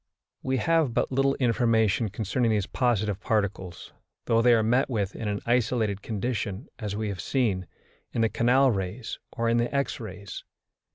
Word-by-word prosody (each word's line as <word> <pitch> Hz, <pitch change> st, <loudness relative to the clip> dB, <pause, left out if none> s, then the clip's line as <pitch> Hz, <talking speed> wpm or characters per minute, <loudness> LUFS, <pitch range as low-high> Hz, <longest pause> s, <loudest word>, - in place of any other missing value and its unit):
We 130 Hz, 0 st, 0 dB
have 160 Hz, -5 st, +2 dB
but -, -, +1 dB
little 135 Hz, +1 st, +2 dB
information 115 Hz, -3 st, +2 dB
concerning 110 Hz, +4 st, -1 dB
these 105 Hz, -3 st, +1 dB
positive 105 Hz, -6 st, 0 dB
particles, 100 Hz, -6 st, -2 dB, 0.3 s
though 115 Hz, 0 st, +3 dB
they 120 Hz, 0 st, +6 dB
are 110 Hz, -, +2 dB
met 125 Hz, +5 st, +2 dB
with 105 Hz, -6 st, -2 dB
in 110 Hz, -, -4 dB
an 105 Hz, 0 st, -2 dB
isolated 115 Hz, -4 st, +1 dB
condition, 105 Hz, 0 st, -3 dB
as 105 Hz, -3 st, -3 dB
we 110 Hz, 0 st, -2 dB
have 95 Hz, -4 st, -4 dB
seen, 100 Hz, -8 st, 0 dB, 0.4 s
in 115 Hz, -, -1 dB
the 115 Hz, -, +3 dB
canal 130 Hz, +4 st, +3 dB
rays 100 Hz, +3 st, -4 dB
or 115 Hz, -, -2 dB
in 115 Hz, 0 st, +3 dB
the 120 Hz, 0 st, 0 dB
X 140 Hz, -4 st, -1 dB
rays. 100 Hz, -3 st, -8 dB
115 Hz, 170 wpm, -27 LUFS, 100-125 Hz, 0.4 s, they